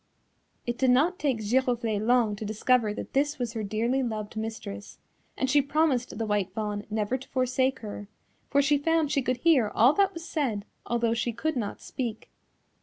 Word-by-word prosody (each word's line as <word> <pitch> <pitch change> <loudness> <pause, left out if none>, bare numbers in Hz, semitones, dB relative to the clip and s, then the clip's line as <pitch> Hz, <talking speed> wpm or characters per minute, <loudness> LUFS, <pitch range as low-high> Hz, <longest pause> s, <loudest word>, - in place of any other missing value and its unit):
It 240 -1 -3
did 260 - +3
not 305 +9 +3
take 275 -5 +1
Giroflée 230 -2 +1
long 235 -2 +3
to 220 - -6
discover 215 +1 +2
that 210 - -7
this 290 +2 +1
was 240 -3 -3
her 225 - -3
dearly 225 +6 0
loved 215 -4 -4
mistress, 220 -2 -6 0.4
and 265 - 0
she 285 +2 +4
promised 280 -4 0
the 225 - -1
White 205 -3 0
Fawn 210 -2 -3
never 215 +4 -1
to 265 - -13
forsake 260 +1 0
her, 205 -2 -7 0.4
for 280 0 +3
she 290 +1 +3
found 320 0 +1
she 280 - +2
could 255 -1 -1
hear 275 -6 +4
all 245 +6 +6
that 395 0 +2
was 335 +1 -7
said 230 -12 -1 0.2
although 235 -1 +1
she 235 +1 -1
could 315 +7 -2
not 215 -5 -3
speak. 235 -4 -5
245 Hz, 185 wpm, -27 LUFS, 215-275 Hz, 0.4 s, all